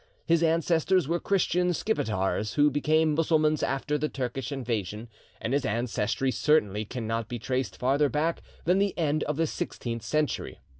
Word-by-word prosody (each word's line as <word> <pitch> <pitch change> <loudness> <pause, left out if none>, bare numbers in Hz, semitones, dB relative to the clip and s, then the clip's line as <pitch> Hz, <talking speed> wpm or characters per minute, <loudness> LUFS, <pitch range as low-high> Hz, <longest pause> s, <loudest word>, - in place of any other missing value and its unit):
His 170 -1 +3
ancestors 165 +1 +2
were 170 +2 0
Christian 180 -2 +1
Skipetars, 105 - -1
who 150 0 +4
became 155 +2 +2
Mussulmans 155 -1 +2
after 145 +2 -1
the 150 +1 -1
Turkish 130 0 -4
invasion, 115 -4 -3 0.3
and 115 - -2
his 140 -2 +1
ancestry 115 +2 0
certainly 110 -9 +2
cannot 115 -1 -3
be 120 - -3
traced 130 +3 -2
farther 140 +3 +2
back 160 +4 0 0.2
than 180 +3 +3
the 200 -1 0
end 155 -2 +1
of 150 -1 -2
the 165 - +2
sixteenth 115 -6 -4
century. 150 +6 -1
145 Hz, 155 wpm, -27 LUFS, 120-160 Hz, 0.3 s, who